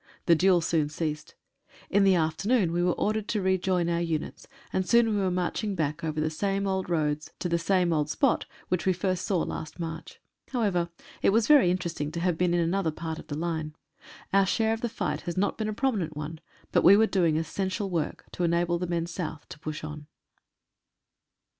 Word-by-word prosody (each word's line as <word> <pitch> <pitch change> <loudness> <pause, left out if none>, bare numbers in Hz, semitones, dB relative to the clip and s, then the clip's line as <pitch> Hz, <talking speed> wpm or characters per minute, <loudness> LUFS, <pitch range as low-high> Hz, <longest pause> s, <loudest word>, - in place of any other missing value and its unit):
The 170 - +6
duel 180 +1 +4
soon 160 -2 +1
ceased. 150 -1 -4 0.6
In 200 0 +4
the 195 -1 +5
afternoon 175 +5 +1
we 175 +1 0
were 180 0 +2
ordered 215 0 -1
to 210 - -1
rejoin 185 -2 +1
our 170 0 0
units, 165 -3 -3 0.3
and 190 - +1
soon 235 -1 +5
we 210 - +1
were 190 - +1
marching 185 +3 -1
back 155 -1 -2
over 155 -1 -2
the 155 +1 0
same 195 +4 -1
old 190 -2 -1
roads 150 -2 0
to - - -2
the 170 -1 +1
same 175 0 +2
old 150 -1 0
spot 275 - +1 0.2
which 180 +1 0
we 185 - +4
first 185 0 -1
saw 185 -5 +1
last 155 +2 -6
March. 165 -1 -6 0.3
However, 195 -8 +1 0.3
it - - +4
was 220 +2 +3
very 280 -8 +6
interesting 170 -5 -2
to 170 - -3
have 175 0 +1
been 175 +1 +1
in 175 - +2
another 170 +1 +1
part 160 +1 -5
of - - -12
the 145 - -4
line. 160 -2 -3 0.6
Our 195 -1 +5
share 220 +3 +2
of 225 - -4
the 240 - 0
great 230 - -12
fight - - -1
has 175 - -5
not 200 - +1
been 215 -1 -2
a - - -1
prominent 210 - -1
one, 155 +2 -5 0.3
but - - +3
we 195 +3 +8
were 220 - +5
doing 170 -7 +2
essential 190 +5 -2
work 170 -5 -3
to 180 - -3
enable 170 0 +1
the 180 - -2
men 170 -1 -1
south 170 -3 -5
to - - -10
push 155 0 -5
on. 150 -1 -7
175 Hz, 210 wpm, -27 LUFS, 160-195 Hz, 0.6 s, we